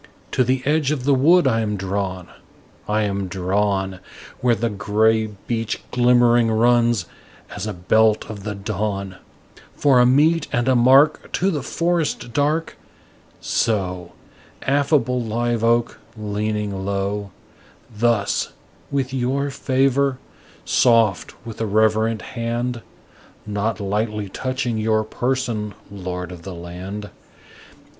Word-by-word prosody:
To 130 Hz, -, +2 dB
the 130 Hz, +1 st, 0 dB
edge 150 Hz, -1 st, +2 dB
of 145 Hz, -4 st, -1 dB
the 140 Hz, +1 st, +3 dB
wood 160 Hz, +6 st, +5 dB
I 115 Hz, -3 st, +2 dB
am 105 Hz, -2 st, -2 dB
drawn, 95 Hz, -1 st, -3 dB, 0.6 s
I 105 Hz, +1 st, +2 dB
am 100 Hz, -2 st, -2 dB
drawn, 95 Hz, +1 st, -1 dB, 0.4 s
Where 120 Hz, -2 st, +3 dB
the 115 Hz, +1 st, -1 dB
gray 110 Hz, +2 st, +2 dB
beach 110 Hz, +2 st, -4 dB
glimmering 120 Hz, -1 st, +4 dB
runs, 120 Hz, -2 st, +3 dB, 0.5 s
as -, -, -4 dB
a 105 Hz, -, -3 dB
belt 110 Hz, +4 st, +2 dB
of 105 Hz, -3 st, -8 dB
the 105 Hz, 0 st, -4 dB
dawn, 100 Hz, -1 st, -3 dB, 0.6 s
For 135 Hz, -4 st, +4 dB
a 125 Hz, -, +6 dB
mete 150 Hz, +5 st, +3 dB
and 120 Hz, +1 st, 0 dB
a 130 Hz, -, +4 dB
mark 135 Hz, +5 st, +4 dB
To 190 Hz, +2 st, +1 dB
the 150 Hz, -5 st, -2 dB
forest 160 Hz, -5 st, -1 dB
dark: 150 Hz, +4 st, 0 dB, 0.6 s
So: 90 Hz, -5 st, -1 dB, 0.5 s
Affable 140 Hz, -2 st, +2 dB
live 115 Hz, 0 st, -1 dB
oak, 115 Hz, 0 st, +1 dB, 0.2 s
leaning 105 Hz, -2 st, -3 dB
low, 100 Hz, +1 st, -2 dB, 0.7 s
Thus 115 Hz, -2 st, +1 dB, 0.4 s
with 135 Hz, -2 st, -2 dB
your 135 Hz, +2 st, -1 dB
favor 135 Hz, 0 st, +1 dB, 0.5 s
soft, 115 Hz, -6 st, +3 dB
with 115 Hz, -1 st, -7 dB
a 110 Hz, -, 0 dB
reverent 110 Hz, +1 st, +2 dB
hand, 120 Hz, 0 st, -3 dB, 0.6 s
(Not 105 Hz, +2 st, -2 dB
lightly 105 Hz, 0 st, -2 dB
touching 130 Hz, 0 st, -2 dB
your 110 Hz, 0 st, +1 dB
person, 115 Hz, -3 st, -2 dB, 0.2 s
Lord 90 Hz, -2 st, -5 dB
of 90 Hz, -2 st, -9 dB
the 95 Hz, +1 st, -8 dB
land!) 90 Hz, +4 st, -7 dB
110 Hz, 125 wpm, -21 LUFS, 100-125 Hz, 0.7 s, a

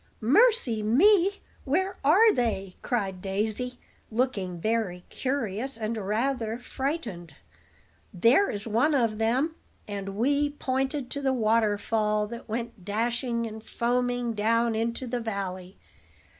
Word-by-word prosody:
"Mercy, 275 Hz, -, +4 dB
me! 365 Hz, -, +5 dB, 0.3 s
where 375 Hz, +8 st, 0 dB
are 405 Hz, +10 st, +6 dB
they?" 205 Hz, -6 st, -1 dB
cried 195 Hz, -7 st, -2 dB
Daisy, 215 Hz, +6 st, -2 dB, 0.3 s
looking 215 Hz, -7 st, -1 dB
very 210 Hz, -3 st, -1 dB
curious 255 Hz, -2 st, -2 dB
and 220 Hz, 0 st, -2 dB
rather 225 Hz, +3 st, -1 dB
frightened. 240 Hz, -, -4 dB, 0.8 s
"There 235 Hz, -, +4 dB
is 205 Hz, 0 st, -4 dB
one 235 Hz, +8 st, +2 dB
of 230 Hz, -5 st, +1 dB
them." 255 Hz, +8 st, +1 dB, 0.3 s
And 195 Hz, -1 st, -5 dB
Wee 285 Hz, +5 st, +2 dB
pointed 265 Hz, 0 st, -1 dB
to 285 Hz, -, -2 dB
the 265 Hz, -1 st, +1 dB
waterfall 215 Hz, -2 st, +1 dB
that 235 Hz, 0 st, -9 dB
went 230 Hz, -3 st, -4 dB
dashing 235 Hz, +3 st, -1 dB
and 220 Hz, -1 st, -7 dB
foaming 245 Hz, 0 st, 0 dB
down 230 Hz, +2 st, +2 dB
into 230 Hz, +3 st, -2 dB
the 245 Hz, 0 st, -2 dB
valley. 195 Hz, -4 st, -5 dB
230 Hz, 120 wpm, -27 LUFS, 210-260 Hz, 0.8 s, are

